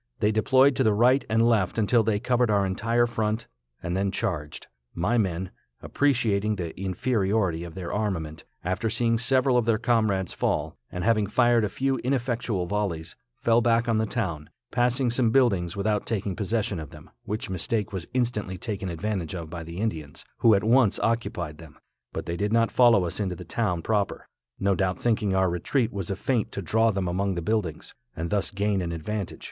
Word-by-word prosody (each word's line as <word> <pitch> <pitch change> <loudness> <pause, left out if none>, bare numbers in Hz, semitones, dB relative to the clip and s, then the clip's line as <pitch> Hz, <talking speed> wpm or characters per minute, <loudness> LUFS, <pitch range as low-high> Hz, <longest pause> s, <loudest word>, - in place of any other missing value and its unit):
They 105 - +2
deployed 130 +5 +4
to - - +3
the 110 -2 +3
right 125 +5 +4
and 115 +1 +3
left 110 -5 +1
until 115 +2 +3
they 105 -1 0
covered 125 0 +1
our 100 -2 +3
entire 115 +5 +1
front, 110 -1 -2 0.4
and 85 +1 -2
then 100 +1 +1
charged. 75 -6 -3 0.3
My 105 +8 +1
men, 95 -3 -1 0.3
appreciating 110 -7 +1
the 85 -4 -5
inferiority 95 -3 0
of 85 0 -9
their 90 -2 -5
armament, 85 -7 -3 0.2
after 95 +6 -1
seeing 115 0 +1
several 130 0 +3
of 120 - +2
their 115 -1 +3
comrades 110 -6 +1
fall, - - -1 0.2
and 90 - -4
having 110 -1 +2
fired 120 +1 +3
a 105 - 0
few 135 +6 0
ineffectual 120 -7 -1
volleys, 90 -5 -3 0.2
fell 115 0 +3
back 115 0 +2
on 115 -2 +2
the 110 - 0
town, 85 -11 -3 0.2
passing 125 0 +1
some 120 -1 +2
buildings 105 -8 +2
without 105 +1 0
taking 100 -4 -2
possession 105 -1 -1
of 75 -2 -7
them, - - -14
which 105 -2 -4
mistake 105 +4 -2
was 95 -3 -4
instantly 115 -6 -1
taken 100 -1 -4
advantage 95 0 -3
of 80 -3 -7
by 85 -1 -5
the 85 +1 -8
Indians, 80 -9 -4
who 115 -2 +6
at 100 - 0
once 115 -1 +4
occupied 90 -9 -2
them, 80 -4 -13 0.3
but - - -5
they 85 - -3
did 105 +2 -1
not 115 0 +3
follow 115 -7 +5
us 85 - -4
into 95 -3 -1
the - - -10
town 85 -2 -1
proper, 105 -1 -1 0.3
no 100 0 +2
doubt 95 -1 0
thinking 105 -4 0
our 95 -2 +2
retreat 115 - 0
was 95 -4 -4
a 100 - -1
feint 120 -2 -1
to 100 - -5
draw 110 +6 +3
them 95 -3 -1
among 95 +2 -1
the 85 - -2
buildings, 95 -5 -2 0.2
and 85 +1 -4
thus 105 -1 +1
gain 100 -1 0
an 85 -1 -3
advantage. 95 +4 -4
105 Hz, 195 wpm, -26 LUFS, 90-115 Hz, 0.4 s, who